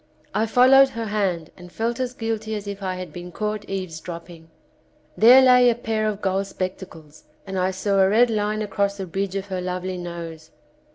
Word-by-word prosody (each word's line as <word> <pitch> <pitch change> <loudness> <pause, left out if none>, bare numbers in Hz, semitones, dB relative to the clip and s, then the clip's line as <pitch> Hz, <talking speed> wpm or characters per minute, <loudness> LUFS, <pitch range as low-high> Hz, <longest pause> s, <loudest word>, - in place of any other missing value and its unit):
I 220 +1 +1
followed 260 +4 +6
her 230 -3 -5
hand 190 -6 -2
and 180 -1 -13
felt 230 +4 -2
as 255 -1 -3
guilty 220 -2 -3
as 210 -1 -6
if 200 0 -6
I 185 -1 -3
had 180 -4 -7
been 175 0 -8
caught 210 +2 -4
eaves 185 -4 -4
dropping. 165 -1 -10 0.7
There 250 +4 +8
lay 250 -1 +6
a 235 - +1
pair 220 -2 -2
of 210 -1 -4
gold 195 0 0
spec 185 -1 -4
tacles 160 -5 -13 0.2
and 195 -1 -6
I 185 0 +1
saw 195 +1 0
a 190 0 +5
red 235 +3 +4
line 215 0 -1
across 200 -1 -1
the 195 - -4
bridge 190 +2 -3
of 195 0 -3
her 185 -1 -3
lovely 180 0 -4
nose. 165 -2 -8
195 Hz, 205 wpm, -23 LUFS, 180-220 Hz, 0.7 s, There